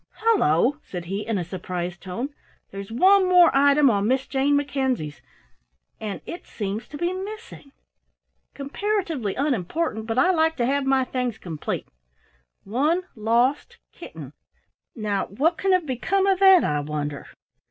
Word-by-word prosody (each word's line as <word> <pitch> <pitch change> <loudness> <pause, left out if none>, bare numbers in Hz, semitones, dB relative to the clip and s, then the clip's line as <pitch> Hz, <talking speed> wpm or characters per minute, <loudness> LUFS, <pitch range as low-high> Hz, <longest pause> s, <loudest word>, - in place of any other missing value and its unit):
"Hullo," 290 - +2
said 175 -2 -7
he 195 +3 -3
in 225 -3 0
a 180 - -1
surprised 175 0 -5
tone, 215 +9 -4 0.4
"there's 195 +1 -8
one 375 - +4
more 355 -4 +6
item 285 +1 +5
on 200 -1 0
Miss 260 +2 +1
Jane 275 +1 +1
Mackenzie's 265 - -1 0.8
and 210 -2 -5
it 345 - -8
seems 205 +1 -4
to 290 - -9
be 345 +3 -1
missing! 390 -6 -8 0.8
Comparatively 305 - -2
unimportant, 255 - -1
but 225 +1 -2
I 365 +8 +4
like 320 -2 +2
to 240 - 0
have 275 +1 0
my 270 -1 +3
things 250 -3 -3
complete. 160 -4 -5 0.8
'One 295 - 0
lost 235 +5 +1
Kitten!' - - -10 0.6
Now 210 -4 -2
what 310 - 0
can 385 +3 +1
have 365 -3 +3
become 310 +9 0
of 385 -2 +2
that, 385 -2 +7
I 150 0 0
wonder?" 145 -1 -4
265 Hz, 145 wpm, -24 LUFS, 200-330 Hz, 0.8 s, that